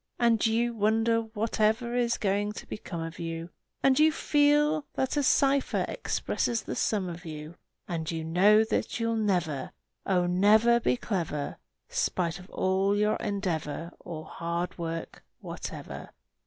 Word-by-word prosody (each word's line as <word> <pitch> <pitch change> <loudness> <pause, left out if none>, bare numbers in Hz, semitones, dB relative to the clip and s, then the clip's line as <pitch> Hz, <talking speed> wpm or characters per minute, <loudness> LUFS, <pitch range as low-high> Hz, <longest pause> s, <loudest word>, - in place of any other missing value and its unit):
And 235 -3 +3
you 235 +1 +2
wonder 225 +1 +2
whatever 220 +1 0
is 240 -1 +1
going 205 +1 0
to - - -8
become 170 -5 -6
of 165 0 -7
you, 165 0 -5 0.3
And 270 0 +4
you 310 +1 +6
feel 295 0 +2
that 265 - 0
a 290 - +2
cipher 275 0 +2
expresses 235 -2 -1
the - - -4
sum 200 -4 0
of 175 0 -7
you; 155 -1 -7 0.3
And 160 -2 -3
you 165 -1 -3
know 195 +7 +5
that 220 - -2
you'll 230 0 0
never, 180 -10 -1 0.3
Oh, 180 -2 +2
never, 210 +6 +5
be 245 - +1
clever, 170 -11 -3 0.3
Spite 175 0 -1
of 180 +2 -13
all 195 +2 +1
your 210 +1 +2
endeavor 170 -5 -3
Or 155 -3 -7
hard 170 +1 -3
work 165 -1 -4 0.2
or - - -8
whatever! - - -7
205 Hz, 150 wpm, -28 LUFS, 170-230 Hz, 0.3 s, you